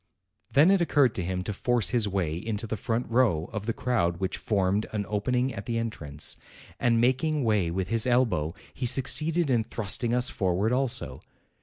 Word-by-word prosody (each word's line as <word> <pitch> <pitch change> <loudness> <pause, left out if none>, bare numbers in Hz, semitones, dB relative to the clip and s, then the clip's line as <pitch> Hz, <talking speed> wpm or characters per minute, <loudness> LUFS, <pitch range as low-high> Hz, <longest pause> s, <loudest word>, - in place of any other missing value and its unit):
Then 155 +7 +5
it 195 -2 +3
occurred 145 -8 +3
to 95 - -3
him 90 +1 -3
to 105 - -4
force 115 -3 0
his 115 -4 +2
way 90 -6 -1
into 105 +4 -4
the 110 - -3
front 115 +3 -2
row 115 -10 +1
of 105 0 -5
the - - +1
crowd 110 -9 0
which 95 +1 -2
formed 100 -2 0
an 105 -1 -2
open 105 +4 -1
ing 125 +1 0
at 100 -2 -8
the 115 - -1
entrance; 75 -11 -1 0.4
and 115 -2 +2
making 130 +5 +1
way 105 -7 +1
with 90 +2 -3
his 115 +2 +2
elbow, 115 -11 +1 0.2
he 125 - -3
succeeded 155 +5 +2
in 120 -3 +2
thrusting 115 +3 0
us 125 +1 +3
forward 95 +3 0
also. 125 - -2
115 Hz, 190 wpm, -27 LUFS, 95-125 Hz, 0.4 s, Then